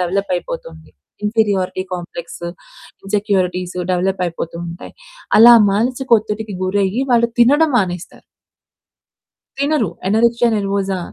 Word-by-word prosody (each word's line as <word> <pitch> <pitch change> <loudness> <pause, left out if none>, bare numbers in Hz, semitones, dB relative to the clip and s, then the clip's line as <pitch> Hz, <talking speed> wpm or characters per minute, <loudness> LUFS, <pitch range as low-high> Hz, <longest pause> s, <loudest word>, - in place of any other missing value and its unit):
Develop 185 +2 -1
అయిపోతుంది. 165 -2 -8 0.3
Inferiority 205 -4 0
complex, 170 -1 -8 0.6
insecurities 190 -3 -1 0.2
develop 185 +1 -1
అయిపోతూ 170 0 -6
ఉంటాయి. 170 +1 -10 0.4
అలా 235 +2 +9 0.2
మానసిక 245 +5 -1
ఒత్తిడికి 210 -1 -5
గురయ్యి 195 +5 0
వాళ్ళు 235 0 +3
తినడం 290 +6 +4
మానేస్తారు. 180 -3 -4 1.4
తినరు. 280 -6 +1 0.2
Anorexia 235 +4 +2
nervosa 195 -1 -1
200 Hz, 95 wpm, -18 LUFS, 180-230 Hz, 1.4 s, అలా